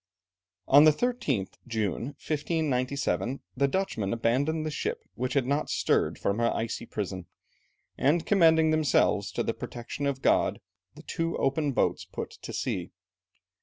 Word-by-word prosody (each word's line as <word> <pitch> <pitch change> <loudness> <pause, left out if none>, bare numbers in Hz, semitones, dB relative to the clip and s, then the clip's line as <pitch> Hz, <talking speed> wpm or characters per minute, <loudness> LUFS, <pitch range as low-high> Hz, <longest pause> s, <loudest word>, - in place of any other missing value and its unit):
On 145 +3 +8
the 155 - +8
13th 150 - -1
June, 110 -2 -1
1597, 140 -4 -1 0.2
the 140 +2 +2
Dutchmen 135 - -1
abandoned 140 +8 0
the 155 - -2
ship, 455 - -3
which 130 +1 -3
had 135 -3 +2
not 145 +3 0
stirred - - +1
from 100 +3 -1
her 115 0 +2
icy 115 +1 -3
prison, 95 -3 -4 0.7
and 160 +5 +2
commending 160 -5 +5
themselves 135 - +2
to - - -1
the - - -1
protection 120 +4 -5
of 135 -1 -3
God, - - +3 0.4
the 155 - -12
two 165 +1 -2
open 140 +2 +1
boats - - +1
put - - -6
to - - -9
sea. - - -3
140 Hz, 145 wpm, -28 LUFS, 120-160 Hz, 0.7 s, On